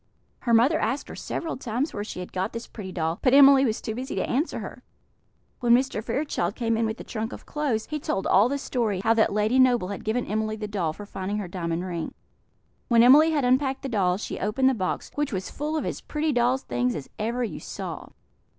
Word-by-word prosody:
Her 235 - 0
mother 270 +8 +4
asked 275 - -2
her - - -7
several 325 - -4
times 250 +4 -2
where 205 - -3
she 195 -3 -6
had 180 - -9
got 190 +3 -2
this 230 0 -5
pretty 195 -4 -8
doll; 165 -1 -2
but 255 0 +4
Emily 275 -1 +8
was 220 -3 0
too 220 - -4
busy 255 +3 -5
to - - -1
answer 290 +7 -1
her. - - -7 0.8
When 240 -2 +5
Mr. 250 -4 0
Fairchild 270 +7 -1
came 230 -2 0
in 225 0 +1
with 220 +1 -4
the - - -8
trunk 225 +1 -4
of - - -9
clothes, 275 -8 -1
he 300 - -4
told 295 -10 -2
all 205 +6 +4
the 280 - -1
story; 230 -8 -1
how 225 +3 +3
that 225 -1 +3
Lady 210 +5 +2
Noble 245 -7 +4
had 200 - -6
given 230 +3 -1
Emily 215 +1 -1
the 215 -1 -5
doll 190 -6 -1
for 205 +6 -9
finding 200 +1 -4
her 205 -3 -3
diamond 170 -1 -3
ring. 170 -3 -4 0.7
When 235 -1 +5
Emily 290 +6 +7
had 295 -5 +1
unpacked 265 +2 +1
the 270 - -3
doll, 185 -6 +1
she 210 - -5
opened 240 +7 +2
the - - +2
box, 185 -6 -3
which 295 -1 -1
was 190 -3 -4
full 300 +2 -3
of - - -2
as - - -4
pretty 305 +1 -1
doll's 245 +2 +2
things 120 0 -1
as 145 - -6
ever 235 +4 -1
you 230 - -4
saw. - - -6
230 Hz, 230 wpm, -25 LUFS, 200-265 Hz, 0.8 s, Emily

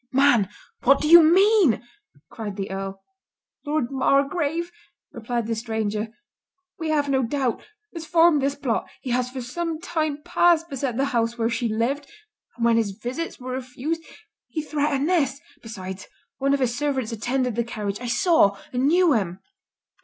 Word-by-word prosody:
"Man, 255 -7 +4 0.3
what 275 +2 +5
do 300 - -1
you 340 +2 +10
mean?" 365 - +4 0.5
cried 210 -3 -6
the 195 -1 -4
Earl. 195 0 -5 0.6
"Lord 295 -4 0
Margrave," 285 +5 +1 0.4
replied 235 0 -3
the 230 - -1
stranger, 220 -1 -2 0.7
"we 320 -1 -3
have 295 -2 +1
no 270 -1 +2
doubt, 255 0 -1 0.3
has 335 -2 -6
formed 335 -3 +4
this 275 +1 0
plot—he 260 -1 -3
has 250 0 0
for 255 0 -6
some 325 +5 -3
time 310 -4 -2
past 345 -1 +3
beset 265 -3 -2
the 270 - +2
house 230 0 0
where 230 0 0
she 235 0 -1
lived; 245 +7 -1 0.5
and 235 - -1
when 230 -1 +4
his 200 -4 -1
visits 260 +9 -4
were 255 0 -6
refused, 260 +5 -4 0.5
he 310 - -4
threatened 295 -1 0
this. 280 -7 +1 0.2
Besides, 190 -4 -8 0.3
one 275 +1 +2
of 280 - -3
his 240 -2 +1
servants 265 -4 -1
attended 250 +2 -1
the 235 +2 0
carriage; 210 -2 -4
I 245 - -4
saw, 240 - +3 0.2
and 250 +2 +1
knew 345 0 +4
him." 190 -5 -1
260 Hz, 160 wpm, -24 LUFS, 230-305 Hz, 0.7 s, you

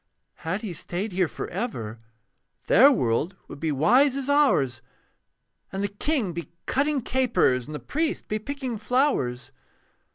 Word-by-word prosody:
Had 185 +7 -3
he 200 -5 -4
stayed 180 +6 -4
here 180 -1 +1
for - - -6
ever, 120 - -4 0.7
Their 270 +7 +7
world 145 - 0
would - - -10
be 160 0 -1
wise 250 - +4
as 275 0 -1
ours 145 - +3 0.9
And 195 +1 -3
the - - +1
king 210 - -1
be 170 0 -6 0.2
cutting 280 +1 +1
capers, 235 - +1
And 150 - -6
the - - -4
priest 310 - -2
be 215 - -2
picking 260 -1 -4
flowers. 220 - 0
205 Hz, 150 wpm, -25 LUFS, -, 0.9 s, Their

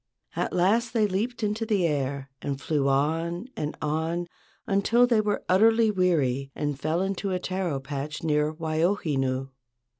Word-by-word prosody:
At - - -1
last 225 +6 +2
they 220 -3 +3
leaped 220 +4 -2
into 210 +2 0
the 210 -5 +1
air 140 -3 -2
and 140 -1 -3
flew 145 -1 0
on 165 - 0
and 150 0 -4
on 160 +3 -1 0.4
until 215 +5 +3
they 235 -3 +3
were 210 -1 -1
utterly 225 +3 +4
weary 145 -9 +1
and 145 -2 -2
fell 160 +5 0
into 195 +1 -2
a 185 - 0
taro 180 -5 -2
patch 145 +3 -5
near 150 -1 +2
Waiohinu. 155 -5 0
170 Hz, 150 wpm, -26 LUFS, 145-200 Hz, 0.4 s, utterly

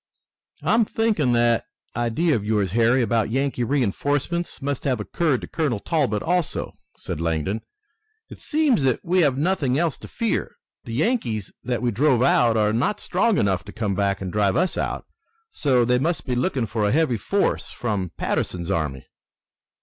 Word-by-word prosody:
"I'm 230 +1 +4
thinking 210 - +1
that 120 -1 +2 0.3
idea 120 +7 +1
of 105 - -2
yours, 105 -3 0
Harry, 120 +4 +3
about 115 -2 +1
Yankee 135 +1 0
reinforcements, 145 - -1
must 140 -1 -3
have 130 -4 0
occurred 140 +5 0
to - - -7
Colonel 150 -9 -1
Talbot 130 -8 0
also," 175 -1 -1 0.2
said 80 - -5
Langdon. 85 +6 -1 0.7
"It - - -12
seems 295 - +2
that 130 -3 0
we 180 +2 +3
have 140 -5 +2
nothing 145 -5 +1
else 165 -2 0
to - - -10
fear. 230 -2 -2 0.3
The 115 - -6
Yankees 120 - -1
that 125 -2 -2
we 120 - +2
drove 125 +2 +3
out 120 -4 +4
are 105 0 +2
not 125 - 0
strong 200 +4 +1
enough 95 -4 +1
to - - -9
come 105 -3 -2
back 100 0 0
and 95 -2 -4
drive 100 -2 +2
us 185 +1 +1
out. - - -3 0.5
So 130 -5 +2
they 125 +1 +2
must 165 +5 -1
be 125 - -2
looking 125 0 0
for 105 0 -1
a - - +1
heavy 145 -5 +2
force 200 - 0
from 105 -6 -3
Patterson's 90 +1 -2
army." 75 -7 -2
125 Hz, 175 wpm, -23 LUFS, 105-155 Hz, 0.7 s, I'm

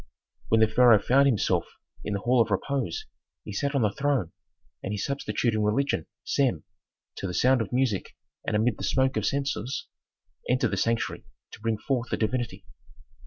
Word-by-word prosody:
When 110 0 +3
the 110 - +6
pharaoh 120 0 +6
found 140 +5 +4
himself 115 -8 +1 0.4
in 105 - -3
the 100 - -3
hall 125 +2 +3
of 115 - +1
"repose" 110 - -2 0.4
he 105 - -7
sat 140 +7 -1
on 135 - +2
the 105 - +2
throne, 135 - 0 0.5
and 95 - -4
his 105 -1 -2
substitute 120 -4 -1
in 110 - 0
religion, 120 +7 0 0.2
Sem, 125 - +1 0.5
to - - -3
the 90 - -4
sound 130 +4 +4
of 110 - -4
music 125 -6 0 0.3
and - - -1
amid 110 +1 +2
the - - -6
smoke 130 0 +2
of - - 0
censers, 135 -2 -2 0.6
entered 125 +1 +2
the - - -1
sanctuary 115 0 -1 0.2
to - - -11
bring 115 0 -1
forth 125 +1 -2
the - - -1
divinity. 120 +2 -2
120 Hz, 180 wpm, -27 LUFS, 105-135 Hz, 0.6 s, the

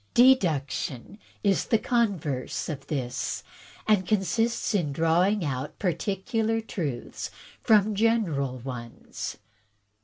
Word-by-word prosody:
" - - -40
Deduction 175 - +3 0.2
is 200 -2 +2
the 225 - +3
converse 195 - -1
of 140 -3 -5
this, 130 -5 -2 0.4
and 205 -4 +3
consists 220 +4 +1
in 170 -8 +1
drawing 170 +6 +2
out 140 +2 -3
particular 205 +5 0
truths 155 - -4 0.3
from 215 -1 +4
general 195 - +1
ones. 120 -2 -6
185 Hz, 100 wpm, -27 LUFS, 140-215 Hz, 0.4 s, from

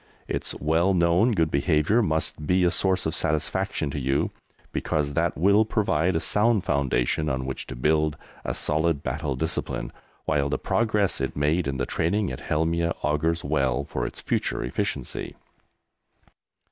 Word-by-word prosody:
Its - - -2
well 85 +5 +2
known 85 +7 +3
good 80 -7 +1
behaviour 75 +9 +2
must 80 -5 -1
be 90 0 +3
a 90 - +3
source 95 0 +2
of 80 - -1
satisfaction 80 0 -1
to 70 - -3
you, 65 +1 0 0.4
because 75 -2 -1
that - - 0
will 100 +6 +5
provide 95 -6 +1
a - - +2
sound 105 +2 +2
foundation 70 +2 0
on 65 -2 -2
which 65 0 -5
to 65 - -6
build 75 +4 +1 0.3
a - - -3
solid 80 -1 0
battle 70 -4 -2
discipline, 65 -4 -3 0.3
while 70 -1 +1
the - - 0
progress 105 -4 +1
it - - -2
made 75 +3 +1
in 70 -1 -2
the - - -1
training 95 +2 0
at 65 - -6
Helmieh 85 +2 0
augurs 80 +3 0
well 70 -2 0
for - - -3
its - - -8
future - - -1
efficiency. 60 - -3
80 Hz, 160 wpm, -25 LUFS, 70-90 Hz, 0.4 s, will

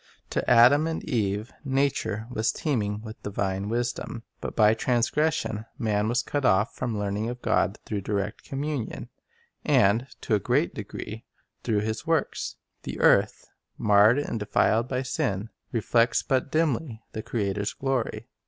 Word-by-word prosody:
To - - -1
Adam 125 +6 +6
and 165 - -3
Eve 105 -1 -1
nature 135 -6 0
was 110 -2 +1
teeming 105 -8 -1
with 110 0 -9
divine 100 0 -2
wisdom. 120 0 -3 0.2
But - - -5
by 105 -1 +5
trans 120 +1 +1
gression 145 -8 0
man 105 -4 0
was 120 +1 +1
cut 145 +2 -2
off 105 -1 +3
from 115 -3 -3
learning 105 +2 -1
of 125 0 -7
God 110 -2 +1
through 105 -2 -3
direct 100 +1 -3
communion, 140 -3 -4 0.5
and, 110 +6 +3
to 115 - -1
a 105 - +4
great - - +1
degree, - - -7 0.4
through 105 -2 +1
His 110 +8 -3
works. 165 -3 0 0.3
The - - -6
earth, - - +4 0.3
marred 105 +3 +5
and 145 -5 -2
denied 110 +3 +2
by 130 0 -1
sin, 105 -4 -2 0.2
reflects 115 0 +2
but 135 0 0
dimly 145 -7 0
the 110 - -4
Creator's 100 -3 -2
glory. 135 -3 -2
115 Hz, 150 wpm, -26 LUFS, 105-130 Hz, 0.5 s, Adam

